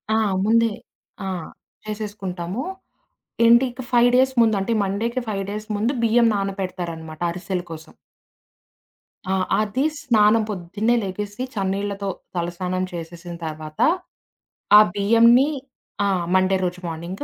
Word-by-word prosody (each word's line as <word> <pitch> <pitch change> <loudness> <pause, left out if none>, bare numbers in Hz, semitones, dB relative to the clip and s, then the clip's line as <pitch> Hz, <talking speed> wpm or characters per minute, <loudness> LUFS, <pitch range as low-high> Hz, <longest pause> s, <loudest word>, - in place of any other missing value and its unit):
ఆ! - - +3 0.3
ముందే. 230 +1 +4 0.6
ఆ! - - -3 0.6
చేసేసుకుంటాము. 205 -1 -4 0.8
ఎంటీ 235 +3 +6
ఇక 255 +2 -8
5 240 0 +5
డేస్ 260 +1 +4
ముందు 220 -3 +4
అంటే 195 +5 -1
మండేకి 230 +6 -1
5 195 -2 -2
డేస్ 210 +1 -5
ముందు 230 +6 0
బియ్యం 230 +1 +4
నానపెడతారనమాట 180 -5 -4
అరిసెల 180 +1 -4
కోసం. 160 0 -10 1.3
ఆ! 190 - 0 0.3
అది 215 +6 -1 0.2
స్నానం 220 -5 +4
పొద్దున్నే 205 +5 -1
లెగేసి, 205 +3 -5
చన్నీళ్లతో 200 0 -2 0.3
తలస్నానం 180 +2 -2
చేసేసిన 170 +1 -7
తర్వాత, 155 0 -7 1.0
ఆ - - +11 0.2
బియ్యంనీ 230 +7 +5 0.6
ఆ! - - +2 0.3
మండే 185 0 +3
రోజు 180 0 -2
మార్నింగ్ 170 - -6
200 Hz, 115 wpm, -22 LUFS, 180-225 Hz, 1.3 s, ఆ